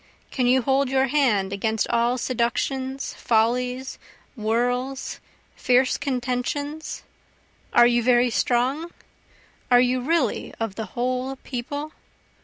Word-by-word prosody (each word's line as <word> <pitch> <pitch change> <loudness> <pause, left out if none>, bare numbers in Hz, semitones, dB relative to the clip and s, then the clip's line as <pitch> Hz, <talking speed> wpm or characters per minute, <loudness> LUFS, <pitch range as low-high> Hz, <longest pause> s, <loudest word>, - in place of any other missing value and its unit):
Can 250 -2 0
you 255 0 +4
hold 270 0 +2
your 265 0 +2
hand 240 -9 +1
against 220 +2 0
all 235 +1 +2
seductions, 260 +2 -2
follies, 250 +3 0 0.4
whirls, 245 +4 -1 0.4
fierce 255 +1 +3
contentions? 280 +3 -3 0.7
are 240 - +6
you 240 0 +3
very 245 0 +3
strong? 260 +9 0 0.8
are 245 -1 +6
you 250 0 +2
really 285 -3 0
of 225 -3 -2
the 220 +2 -5
whole 255 +2 -1
People? 285 +4 -5
250 Hz, 110 wpm, -24 LUFS, 240-265 Hz, 0.8 s, are